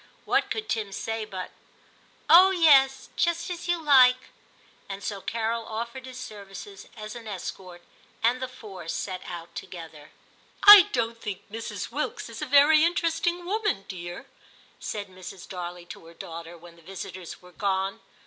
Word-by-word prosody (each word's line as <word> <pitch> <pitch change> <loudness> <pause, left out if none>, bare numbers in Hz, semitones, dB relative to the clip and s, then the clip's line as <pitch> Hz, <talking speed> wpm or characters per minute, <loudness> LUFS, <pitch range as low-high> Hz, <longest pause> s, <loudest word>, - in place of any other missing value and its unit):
What - - +1
could 435 -1 -3
Tim 215 -3 -2
say 225 +2 -3
but, 185 -3 -7 0.4
' - - -32 0.3
Oh 365 +3 +9
yes, 280 -7 +4
just 340 +1 0
as 350 0 -6
you 350 -1 +1
like 255 -4 +5
' - - -32
} - - -32
And 195 0 -6
so 200 -2 -4
Carol 230 +1 -2
offered 235 +4 -5
his 255 0 -9
services 200 -4 -10
as 215 0 -7
an 230 -2 -9
escort, 185 -2 -7 0.4
and 245 +3 +2
the 260 - -2
four 190 -9 -11
set 185 +2 -4
out 170 -1 -8
together. 160 -4 -9 0.5
*I 410 -3 +11
don't 230 -1 -2
think 200 -2 -6
Mrs. 225 +1 -5
Wilkes - - -3
a 300 - -3
very 290 +3 +6
inter 335 0 +2
esting 345 +2 -1
woman, 410 - -1
dear,' 175 +4 -7 0.5
said 205 -2 -5
Mrs. 185 0 -11
Darley 175 -2 -7
to 165 - -11
her 170 - -15
daughter 170 +1 -9
when 170 0 -15
the - - -18
visitors 185 0 -8
were 180 - -15
gone. 195 +2 -1
215 Hz, 170 wpm, -26 LUFS, 185-270 Hz, 0.5 s, I